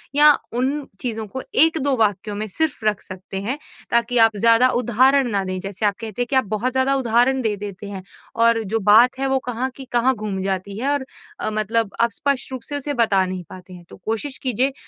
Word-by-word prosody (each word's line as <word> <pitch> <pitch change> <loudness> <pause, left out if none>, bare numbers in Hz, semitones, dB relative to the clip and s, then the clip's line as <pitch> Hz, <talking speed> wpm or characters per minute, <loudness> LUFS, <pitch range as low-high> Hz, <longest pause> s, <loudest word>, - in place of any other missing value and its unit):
या 300 +1 +8 0.3
उन 275 +3 -1
चीज़ों 225 -3 -3
को 260 +6 -6 0.2
1-2 310 -5 +1
वाक्यों 205 -1 0
में 215 +1 -3
सिर्फ़ 295 -1 -2
रख 210 -2 +1
सकते 190 +1 -9
हैं 250 +8 -3 0.3
ताकि 235 +1 +1
आप 225 -2 +5
ज़्यादा 230 +4 +5
उदाहरण 260 +2 +3
ना 200 -1 0
दें। 185 0 -3
जैसे 195 +2 -4
आप 200 -1 +2
कहते 225 +1 -5
हैं - - -8
कि 275 - 0
आप 260 - +3
बहुत 215 +5 -2
ज़्यादा 265 +1 +2
उदाहरण 255 +1 +2
दे 215 -3 0
देते 205 0 -7
हैं 190 -2 -7 0.4
और 230 -1 +4
जो 220 +2 -1
बात 245 +5 +6
है 270 - 0
वो 265 - +2
कहाँ 250 +2 -2
की 270 - -10
कहाँ 245 +2 +3
घूम 205 -3 -4
जाती 195 +1 -3
है 270 - -1
और 285 -2 -1 0.3
अ, - - -2
मतलब 215 0 0
अ, 235 - +5
स्पष्ट 270 +4 -2
रूप 255 - -5
से 290 - -2
उसे 285 +1 -3
बता 215 -6 +2
नहीं 185 -1 -5
पाते 185 0 -12
हैं। 175 -1 -12
तो - - -12
कोशिश 225 +5 -3
कीजिए 260 +2 0
230 Hz, 220 wpm, -21 LUFS, 205-260 Hz, 0.4 s, या